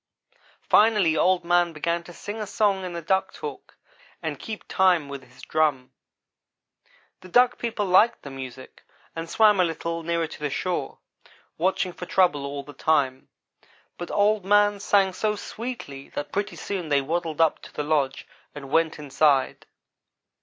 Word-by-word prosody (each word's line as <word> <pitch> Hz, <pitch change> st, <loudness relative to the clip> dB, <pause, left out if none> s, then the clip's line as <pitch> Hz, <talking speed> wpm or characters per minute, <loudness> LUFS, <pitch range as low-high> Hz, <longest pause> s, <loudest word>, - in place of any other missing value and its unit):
Finally 210 Hz, -7 st, +4 dB
Old 180 Hz, +1 st, +2 dB
man 175 Hz, -1 st, +2 dB
began 170 Hz, +2 st, -2 dB
to 175 Hz, -, -12 dB
sing 205 Hz, +5 st, -7 dB
a 210 Hz, -, -4 dB
song 200 Hz, -2 st, +1 dB
in 180 Hz, -1 st, -5 dB
the 170 Hz, -1 st, -5 dB
duck 190 Hz, +4 st, +1 dB
talk, -, -, -9 dB, 0.4 s
and -, -, -4 dB
keep 220 Hz, -2 st, -7 dB
time 180 Hz, -6 st, +3 dB
with 140 Hz, -1 st, -7 dB
his 130 Hz, 0 st, -18 dB
drum. 150 Hz, -5 st, 0 dB, 1.3 s
The -, -, -13 dB
Duck 245 Hz, +5 st, +4 dB
people 230 Hz, -3 st, -2 dB
liked 195 Hz, +5 st, +4 dB
the 140 Hz, -, -8 dB
music, 130 Hz, -1 st, -9 dB, 0.3 s
and 165 Hz, 0 st, -5 dB
swam 210 Hz, +1 st, +4 dB
a -, -, +6 dB
little 165 Hz, 0 st, -3 dB
nearer 170 Hz, 0 st, -1 dB
to 160 Hz, -, -10 dB
the 150 Hz, -1 st, -2 dB
shore, 180 Hz, +5 st, -3 dB, 0.6 s
watching 185 Hz, +1 st, 0 dB
for 180 Hz, -, -8 dB
trouble 150 Hz, -7 st, +2 dB
all 140 Hz, 0 st, -5 dB
the 145 Hz, +1 st, -12 dB
time, 135 Hz, -3 st, 0 dB, 0.7 s
but 175 Hz, -, -5 dB
Old 205 Hz, 0 st, +2 dB
man 205 Hz, +1 st, +3 dB
sang 195 Hz, -1 st, +2 dB
so 210 Hz, +3 st, -1 dB
sweetly 210 Hz, -, -7 dB
that 145 Hz, -, -4 dB
pretty 205 Hz, +1 st, -2 dB
soon 185 Hz, -6 st, -4 dB
they 140 Hz, -1 st, +3 dB
waddled 165 Hz, +2 st, -3 dB
up 165 Hz, -2 st, +3 dB
to -, -, -12 dB
the 150 Hz, -, -3 dB
lodge 145 Hz, -3 st, 0 dB, 0.3 s
and 140 Hz, -2 st, -9 dB
went 165 Hz, -1 st, +2 dB
inside. 145 Hz, -2 st, +1 dB
170 Hz, 165 wpm, -25 LUFS, 145-195 Hz, 1.3 s, a